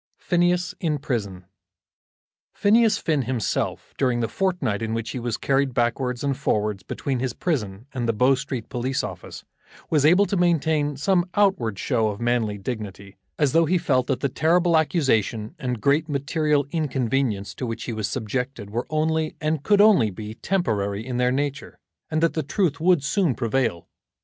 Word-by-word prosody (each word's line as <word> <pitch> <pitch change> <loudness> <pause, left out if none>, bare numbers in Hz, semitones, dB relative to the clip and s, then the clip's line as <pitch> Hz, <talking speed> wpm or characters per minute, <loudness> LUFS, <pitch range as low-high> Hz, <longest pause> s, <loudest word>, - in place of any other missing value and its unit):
PHINEAS 175 0 +1
IN 155 -3 0
PRISON. 105 - -4 1.1
Phineas 220 +2 +4
Finn 155 -4 0
himself, 125 -2 -2
during 125 -3 +2
the 115 - 0
fortnight 175 - -1
in 110 0 -2
which 115 -1 -3
he 130 - -4
was 120 -1 -2
carried 135 -2 0
backwards 125 +1 0
and 140 -1 0
forwards 105 -7 -1
between 130 +7 -3
his 130 -1 -2
prison 110 - -2
and 120 -3 -2
the - - +3
Bow 125 +5 +4
Street 130 -3 -4
Police 130 +1 -2
office, - - -7 0.5
was 150 -3 +3
able 180 +7 +5
to 195 - -2
maintain 160 -5 +1
some 180 +4 +1
outward 190 - +2
show 115 -2 +1
of 105 -1 -4
manly 120 -3 0
dignity, 100 -2 -6 0.2
as 145 -4 +2
though 165 +3 +4
he 180 +4 +2
felt 130 -6 +1
that 130 -2 -1
the - - +2
terrible 170 +5 +2
accusation 130 - +1
and 125 -5 -3
great 145 +7 +2
material 145 0 +1
inconvenience 130 - -1
to 125 - -5
which 115 0 -4
he 120 - -4
was 110 -2 -2
subjected 120 0 -4
were 120 +3 -3
only, 155 0 0
and 155 -1 -1
could 205 +6 +4
only 200 - +5
be, 105 +2 -7
temporary 110 - -1
in 125 -1 -3
their 125 0 +2
nature, 145 +1 -3 0.3
and 155 +1 0
that 165 - +3
the 160 - -1
truth 160 +1 0
would 175 -3 +3
soon 150 - +1
prevail. 115 -7 -1
135 Hz, 175 wpm, -24 LUFS, 115-160 Hz, 1.1 s, able